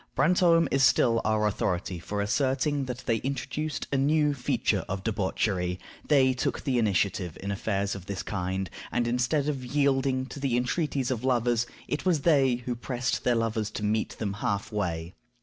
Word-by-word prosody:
Brantome 170 +3 +4
is 135 - +2
still 120 -3 +4
our 110 0 +1
authority 95 -3 -1
for 100 +4 -3
asserting 135 +5 0
that 125 0 -6
they 115 -2 +2
introduced 135 +5 -3
a 140 - +2
new 150 +2 +3
feature 125 -3 0
of 95 0 -3
debauchery; 95 -3 -1 0.3
they 135 -3 +4
took 125 - -2
the 130 -4 +1
initiative 95 -5 0
in 100 - -4
affairs 100 0 -1
of 95 -2 -8
this 100 -2 -4
kind, 95 -1 -2 0.2
and 120 -1 0
instead 125 +5 +1
of 140 -4 -2
yielding 135 -1 +1
to 135 - -9
the 135 -3 +1
entreaties 135 0 0
of 125 -2 -2
lovers, 120 -2 +2 0.2
it 140 - -2
was 170 -5 +2
they 135 -5 +4
who 125 - -1
pressed 125 0 -2
their 125 - +3
lovers 115 -2 0
to 105 - -6
meet 110 +1 -1
them 100 -3 -2
half 100 0 -2
way. 90 -4 -2
120 Hz, 175 wpm, -28 LUFS, 100-135 Hz, 0.3 s, Brantome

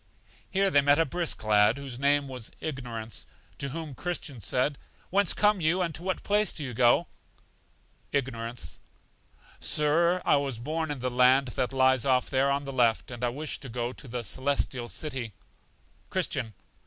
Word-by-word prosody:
Here 195 0 +2
they 145 - +5
met 145 +1 +4
a 165 - +3
brisk 170 -1 -1
lad, 105 +2 +4
whose 135 -3 -7
name 140 0 +3
was 125 -4 -6
Ignorance, 120 -7 -5 0.3
to 140 - -2
whom 155 0 -6
Christian 150 -5 -4
said: 130 +8 0 0.3
Whence 200 0 +3
come 210 -2 +3
you, 170 +4 +2
and 165 -2 -2
to 160 - -6
what 185 0 -2
place 210 -1 +2
do 155 - -6
you 130 -3 -5
go? 120 +8 +4 1.1
Ignorance. 115 - -3 0.8
Sir, 170 +4 +3
I - - +5
was 140 -4 -2
born 155 +6 -3
in 145 -4 -4
the 125 0 -1
land 130 +2 +4
that 125 +1 -1
lies 130 -2 +3
off 130 -2 +2
there 135 0 +3
on 140 +1 0
the 135 - -5
left, 120 -2 +2
and 120 0 -7
I 120 - +2
wish 145 +5 -4
to 135 - -8
go 120 +1 -3
to 140 - -12
The 120 0 -4
Celestial 130 +1 -1
City. 130 -8 -3 0.8
Christian. 110 -6 -2
135 Hz, 175 wpm, -28 LUFS, 120-155 Hz, 1.1 s, they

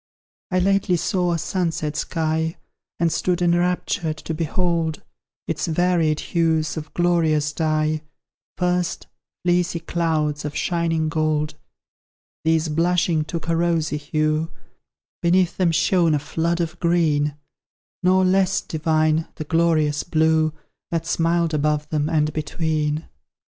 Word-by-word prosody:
I 185 - 0
lately 195 0 +2
saw 180 +1 0
a 170 - +1
sunset 160 -2 -2
sky, 160 0 -1 0.4
And 170 -1 +2
stood 175 +2 0
enraptured 175 -2 0
to 160 - -5
behold 165 0 -1 0.4
Its - - -2
varied 165 -2 +1
hues 160 -3 0
of 155 -1 -6
glorious 160 -4 +2
dye: 155 -1 0 0.6
First, 180 -1 0 0.4
fleecy 175 -1 +1
clouds 160 -3 -1
of 150 0 -5
shining 165 -2 0
gold; 155 -1 0 0.9
These 160 0 +2
blushing 170 0 +1
took 165 0 -5
a 165 - +1
rosy 165 -2 +1
hue; 155 +1 0 0.7
Beneath 175 0 +2
them 180 -3 +3
shone 165 -1 +3
a - - +2
flood 165 +4 -1
of 170 +1 -4
green; 155 -4 +2 0.7
Nor 185 +1 +4
less 190 0 +3
divine, 155 0 +1
the - - -5
glorious 155 -2 +2
blue 160 -1 +2 0.4
That 165 -1 -2
smiled 165 0 +1
above 150 0 0
them 150 -1 0
and 155 -2 +1
between. 155 0 -1
160 Hz, 125 wpm, -22 LUFS, 155-175 Hz, 0.9 s, Nor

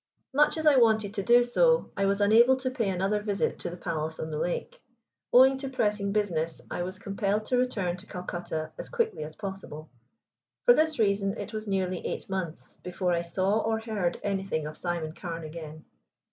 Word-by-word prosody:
Much 295 +3 +3
as 315 - -3
I 295 -3 +6
wanted 220 -4 +3
to 205 - -1
do 240 +4 +5
so, 485 - +3
I 195 0 +1
was 200 +1 +1
unable 230 +5 +6
to 260 0 -3
pay 230 -6 -1
another 195 +3 0
visit 205 -2 -1
to - - -4
the 175 - -8
palace 160 -2 -3
on 160 - -4
the 150 - -3
lake. 175 - -3 0.5
Owing 265 +2 +6
to 270 0 -4
pressing 210 -5 0
business, 170 -6 -1
I - - -2
was 185 +2 -4
compelled 200 +1 -1
to 250 - +1
return 200 -8 -1
to 195 +3 -14
Calcutta 175 -4 -5
as - - -7
quickly 465 - -1
as 155 +1 -8
possible. 190 - -7 0.7
For 485 - +9
this 315 -6 +2
reason 200 -1 +1
it - - -6
was 215 0 -5
nearly 185 -2 -1
eight - - -4
months 180 -4 -5
before 180 0 -2
I 170 - +1
saw 190 +5 0
or 220 0 0
heard 210 -6 -2
anything 195 -6 -1
of 155 0 -6
Simon 170 -3 -3
Carne 170 -1 -6
again. 155 -1 -8
195 Hz, 195 wpm, -28 LUFS, 175-225 Hz, 0.7 s, For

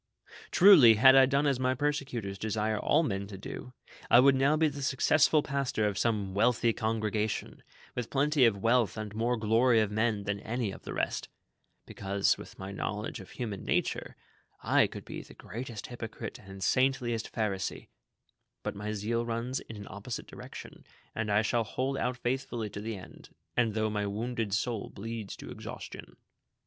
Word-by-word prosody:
"Truly, 165 - +8
had 130 +4 +7
I 135 -1 +7
done 140 +2 +2
as 140 -3 +2
my 130 0 +1
persecutors 125 -8 -2
desire 110 0 -1
all 155 +8 +3
men 100 -7 -2
to 100 -1 -8
do, 110 +5 -8 0.4
I 120 - +8
would 135 +2 +7
now 135 +3 +3
be 160 0 +4
the 145 -1 -5
successful 150 +2 +3
pastor 135 -6 -1
of 105 -2 0
some 105 -2 0
Avealthy 115 +2 +3
congregation, 110 -1 -2 0.3
with 125 -2 -4
plenty 145 0 +2
of 110 -4 +3
wealth 115 -1 +3
and 105 -1 -5
more 120 +3 0
glory 115 +2 +4
of 105 -1 +1
men 110 -1 0
than 100 0 -2
any 115 0 -2
of - - -11
the - - -5
rest; - - -2 0.6
because, 100 0 0
with - - -12
my 95 +1 -6
knowledge 105 +4 -4
of 95 - -12
hu 125 - -3
man 100 -4 -5
nature, - - -1 0.5
I - - +4
could - - -9
l^e - - -8
the - - -14
greatest 115 -2 -7
hypocrite 115 -2 -7
and 95 -1 -9
saintliest 130 -3 +1
Pharisee; 100 -4 -3 0.7
but - - -2
my 105 +1 -4
zeal 115 +3 -1
runs 120 +2 -2
in 115 - -10
an 100 -1 -8
opposite 110 +3 -6
direction, - - -10 0.3
and 110 -1 -2
I 105 +2 +3
shall 115 +2 +1
hold 130 +5 -2
out 125 0 -1
faithfully 120 -4 -2
to 100 - -6
the 110 -1 -4
end, 95 - -13 0.3
and 115 -3 +2
though 110 -1 0
my 105 -1 -1
wounded 115 +1 -2
soul 110 -1 -2
bleeds 110 0 -6
to - - -9
exhaustion. - - -8
115 Hz, 180 wpm, -30 LUFS, 105-125 Hz, 0.7 s, Truly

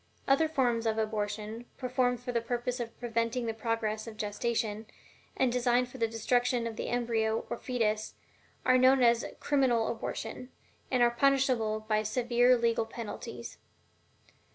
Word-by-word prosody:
Other 275 +4 +4
forms 245 -7 +1
of 220 0 0
abortion, 215 +1 -3
performed 250 -1 0
for 245 - -4
the 235 -1 0
purpose 245 +2 -2
of 230 -1 -6
preventing 235 +1 -1
the 225 - -1
progress 220 -1 -2
of 225 - -7
the - - -23
gestation, 220 0 -2 0.5
and 260 -2 +2
designed 245 0 +2
for 260 - -11
the 230 - +2
destruction 245 +2 +1
of 230 -1 -4
the - - -4
embryo 225 -2 0
or - - -1
fetus, 220 -4 -1 0.5
are 255 0 +5
known 260 0 +5
as 235 -1 +4 0.2
"criminal 255 -6 +2
abortion," 225 +2 -5 0.4
and 250 -2 +3
are 240 - +4
punishable 250 -4 +2
by 215 0 +1
several 245 +3 +3
legal 230 -1 +1
penalties. 225 -1 -7
235 Hz, 155 wpm, -30 LUFS, 220-250 Hz, 0.5 s, are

